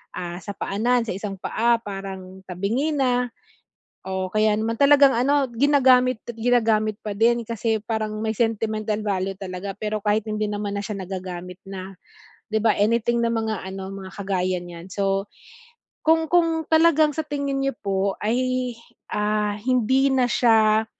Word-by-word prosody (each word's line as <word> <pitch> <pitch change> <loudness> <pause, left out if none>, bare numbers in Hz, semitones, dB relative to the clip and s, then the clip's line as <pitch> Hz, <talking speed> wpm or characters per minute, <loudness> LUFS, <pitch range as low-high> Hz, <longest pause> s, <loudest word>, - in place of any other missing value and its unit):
ah, 175 -1 -5
sa 205 - -6
paanan 235 +5 +1
sa - - -2
isang 200 0 -5
paa 235 +1 +2
parang 190 -2 -7
tabingi 225 - -1
na, 250 -3 +1 0.8
o 190 0 -2
kaya 215 0 +3
naman 225 +1 -1
talagang 280 -1 +7
ano 275 +3 +2
ginagamit 255 -2 +4
at 240 - -6
ginagamit 220 -3 +2
pa 210 - -3
din 235 +2 +3
kasi 225 0 -1
parang 215 -1 -2
may 220 - 0
sentimental 220 -2 -1
value 195 -2 -1
talaga 190 +1 -5
pero 215 0 -2
kahit 210 +1 +2
hindi 215 0 -1
naman 205 -1 -3
na - - -3
siya 210 0 -4
nagagamit 180 -1 -6
na, 190 0 -7 0.6
'di 220 - +1
ba, 220 -2 +4
anything 235 +3 +2
na 230 - +1
mga 220 -3 -2
ano 190 0 -6
mga 190 -1 -8
kagaya 185 -2 -1
niyan. 175 0 -10
So, 195 0 -1 0.7
kung 320 0 +3
kung 330 -2 +3
talagang 315 -2 +5
sa 315 - 0
tingin 280 -1 -2
nyo 275 -2 0
po 195 -1 0
ay, 255 +2 0 0.4
ah, 210 0 0
hindi 255 +3 +2
na 255 -1 +3
siya, 220 -2 +4
215 Hz, 155 wpm, -23 LUFS, 195-250 Hz, 0.8 s, talagang